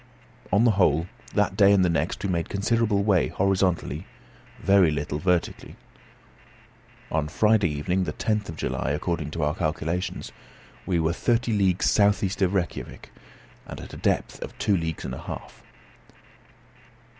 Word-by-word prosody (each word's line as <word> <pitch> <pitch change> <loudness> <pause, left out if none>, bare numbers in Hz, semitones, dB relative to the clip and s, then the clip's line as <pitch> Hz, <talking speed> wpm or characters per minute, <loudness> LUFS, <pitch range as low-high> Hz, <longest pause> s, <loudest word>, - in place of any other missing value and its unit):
On 100 +4 +4
the 120 - +5
whole, 85 -5 +2 0.3
that 105 -2 +2
day 100 -1 +6
and 95 -2 +4
the - - +3
next 85 +3 -1
we 100 - -1
made 85 -2 -1
considerable 105 0 +1
way 100 -4 +3
horizontally, 95 -4 0 0.5
very 95 -4 +4
little 75 0 -2
vertically. 90 0 -1 1.4
On 80 -1 0
Friday 105 +2 +3
evening, 90 +6 -1
the - - -3
10th 105 -3 -1
of 80 - -6
July, 70 - -2
according 80 0 -2
to 80 0 -3
our 75 0 +1
calculations, 80 +3 -3 0.6
we 90 -3 +1
were 80 +1 +1
thirty 120 +4 0
leagues 95 -3 +2
south 100 0 +3
east 95 +1 -2
of 95 0 +2
Rejkiavik, 90 -5 -4 0.6
and - - -8
at - - -10
a - - -7
depth - - -1
of - - -7
two 105 - +2
leagues 80 -3 -3
and - - -4
a - - -7
half. - - -8
95 Hz, 155 wpm, -25 LUFS, 80-100 Hz, 1.4 s, day